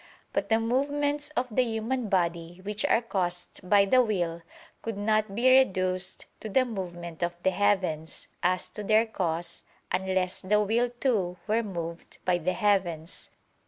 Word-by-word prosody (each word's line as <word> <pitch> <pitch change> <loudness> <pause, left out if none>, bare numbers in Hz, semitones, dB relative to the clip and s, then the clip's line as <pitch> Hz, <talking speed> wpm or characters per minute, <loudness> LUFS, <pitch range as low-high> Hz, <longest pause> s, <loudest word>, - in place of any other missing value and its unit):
But - - -1
the 225 0 +4
movements 285 +5 0
of 250 - +2
the 235 - +3
human 230 0 -1
body, 170 -2 0
which 210 +1 -2
are 230 - +3
caused 180 -3 -3
by 200 -1 +6
the 255 +6 +5
will, 175 -7 -1 0.4
could 225 -3 -4
not 215 -1 +1
be 240 +4 +2
reduced 185 -8 +3
to 220 - -6
the 255 +5 +3
movement 175 -7 -6
of 175 0 -1
the 190 - +3
heavens, 185 -6 0
as 180 0 +1
to 210 - -6
their 215 +2 +4
cause, 170 -5 -3 0.3
unless 185 0 0
the 210 +2 +2
will 225 +4 +2
too 195 -9 +1
were 220 +2 +2
moved 170 -5 -6
by 180 -1 +2
the 180 +2 0
heavens. 185 -6 0
195 Hz, 160 wpm, -28 LUFS, 175-225 Hz, 0.4 s, by